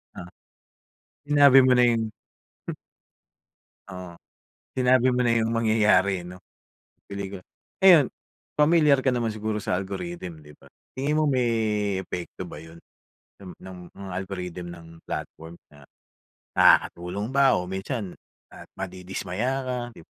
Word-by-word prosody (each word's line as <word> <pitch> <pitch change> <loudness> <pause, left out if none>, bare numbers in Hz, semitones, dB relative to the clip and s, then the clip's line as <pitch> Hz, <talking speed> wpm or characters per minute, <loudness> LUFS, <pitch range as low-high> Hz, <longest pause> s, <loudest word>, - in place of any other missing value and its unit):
Ah, 85 - -8 1.0
sinabi 145 -2 +6
mo 130 - +5
na 125 - +5
yun. 115 -1 +1 1.9
Oo, 90 -3 -9 0.6
sinabi 130 0 +4
mo 125 0 0
na 115 - +3
yung 115 -1 +1
mangyayari, 105 -5 +2
eh, - - -12
'no, 90 +1 -10 0.7
pelikula. 100 -1 -6 0.4
Ayun, 175 -8 +6 0.5
pamilyar 150 -2 +5
ka 130 - -3
naman 115 -2 -1
siguro 110 -1 -3
sa 90 - 0
algorithm, 95 - -6
'di 75 - -14
ba? - - -18 0.2
Tingin 140 +3 -1
mo 155 - +2
may, 110 -6 0
epekto 90 -3 -6
ba - - -9
yun 80 +1 -13 0.7
ng 95 -2 -11
ng 95 -1 -11 0.2
mga 100 -1 -8
algorithm 90 -1 -5
ng 85 -1 -10 0.2
platform? 80 +1 -7 0.2
Na 75 - -17 0.8
nakakatulong 90 +5 +3
ba 135 0 +4
o 90 - -7
minsan, 95 +1 -5 0.3
ah, - - -12
madidismaya 95 +5 -4
ka? 130 -1 -3 0.2
'Di - - -14
ba? - - -19
105 Hz, 135 wpm, -25 LUFS, 90-125 Hz, 1.9 s, sinabi